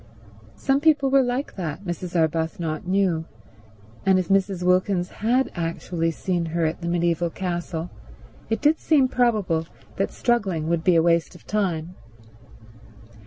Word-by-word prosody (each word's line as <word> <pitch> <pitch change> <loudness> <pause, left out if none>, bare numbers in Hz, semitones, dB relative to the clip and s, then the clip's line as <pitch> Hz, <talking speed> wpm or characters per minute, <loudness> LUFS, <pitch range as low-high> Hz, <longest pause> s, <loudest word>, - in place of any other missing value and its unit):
Some 270 0 +1
people 290 -4 +3
were 275 0 +6
like 250 +1 -2
that, 170 0 -4
Mrs. 175 0 -5
Arbuthnot 160 0 -1
knew; 185 -4 +1 0.8
and 190 -1 +4
if 185 -2 -1
Mrs. 195 -2 +1
Wilkins 180 0 +2
had 245 +5 0
actually 165 0 -2
seen 175 +1 -2
her 165 0 0
at 160 +3 -2
the 170 - -4
mediaeval 170 0 +1
castle 175 -1 -4 0.6
it 225 - -1
did 300 +2 +3
seem 285 -5 +3
probable 210 -11 +1 0.3
that 195 - 0
struggling 195 -10 0
would 170 -1 0
be 180 -1 +4
a 165 - +4
waste 170 +1 +2
of 175 - -16
time. 180 -5 -1
180 Hz, 145 wpm, -24 LUFS, 165-210 Hz, 0.8 s, were